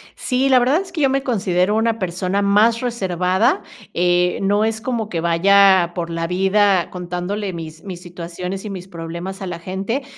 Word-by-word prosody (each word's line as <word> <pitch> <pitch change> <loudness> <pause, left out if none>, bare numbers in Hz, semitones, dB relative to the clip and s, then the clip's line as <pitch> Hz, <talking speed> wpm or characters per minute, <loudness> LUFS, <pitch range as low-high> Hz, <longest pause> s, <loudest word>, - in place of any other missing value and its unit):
Sí, 260 +2 0
la 260 -1 +6
verdad 265 +8 +2
es 390 - -10
que 325 - -3
yo 275 - +4
me 270 0 0
considero 195 -5 +1
una 225 0 +1
persona 185 +2 -1
más 210 +3 +3
reservada, 190 - 0 0.3
eh, 180 0 +2
no 205 +2 +2
es 220 0 -2
como 230 -3 -2
que 170 -5 -2
vaya 190 +1 +4
por 170 -2 -3
la 165 0 -2
vida 190 +1 +2
contándole 180 +3 -4
mis 160 -1 -8
mis 185 -3 -7
situaciones 180 +2 -6
y - - -4
mis 185 -2 -7
problemas 170 +3 -7
a 190 - -4
la 170 -2 -5
gente. 195 +9 -3
190 Hz, 185 wpm, -20 LUFS, 175-220 Hz, 0.3 s, la